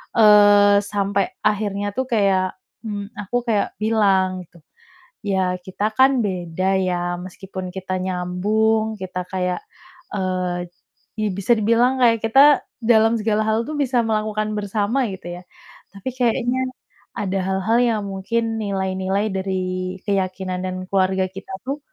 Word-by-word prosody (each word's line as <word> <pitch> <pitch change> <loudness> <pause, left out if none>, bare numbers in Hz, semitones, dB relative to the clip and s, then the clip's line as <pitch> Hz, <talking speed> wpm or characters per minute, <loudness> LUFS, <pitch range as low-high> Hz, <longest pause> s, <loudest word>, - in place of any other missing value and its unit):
eee, 205 -2 +7
sampai 200 -1 0 0.2
akhirnya 205 -1 -1
tuh 260 - -1
kayak, 195 -4 +2 0.3
mmm, 205 -2 -5
aku 205 +4 -5
kayak 215 -3 0
bilang 195 -4 +2
gitu, 170 - -20 0.7
"Ya, 190 -2 0
kita 190 +2 -4
kan 265 -1 +5
beda 185 0 -1
ya 175 -1 -1
meskipun 185 0 -7
kita 185 0 -4
nyambung, 215 +5 0
kita 185 -1 -4
kayak, 180 -1 -1 0.5
eee, 185 -2 -2 0.5
i 215 -1 0
bisa 200 +5 +2
dibilang 235 +4 +2
kayak 230 -2 +4
kita 275 +6 +6 0.2
dalam 225 0 +4
segala 215 0 +1
hal 220 +1 +2
tuh - - -3
bisa 255 -4 +2
melakukan 215 -1 -1
bersama 210 +5 0
gitu 175 -2 -7
ya, - - -16 0.5
tapi 200 +6 -5
kayaknya 245 +1 +1 0.6
ada 195 -1 -1
hal-hal 190 +4 +1
yang 225 -4 +1
mungkin 225 +4 -2
nilai-nilai 190 +1 -1
dari 190 -1 -2 0.4
keyakinan 185 -2 -1
dan 185 0 -3
keluarga 190 -1 +2
kita 195 0 -10
tuh 275 +2 -2
200 Hz, 130 wpm, -21 LUFS, 185-220 Hz, 0.7 s, eee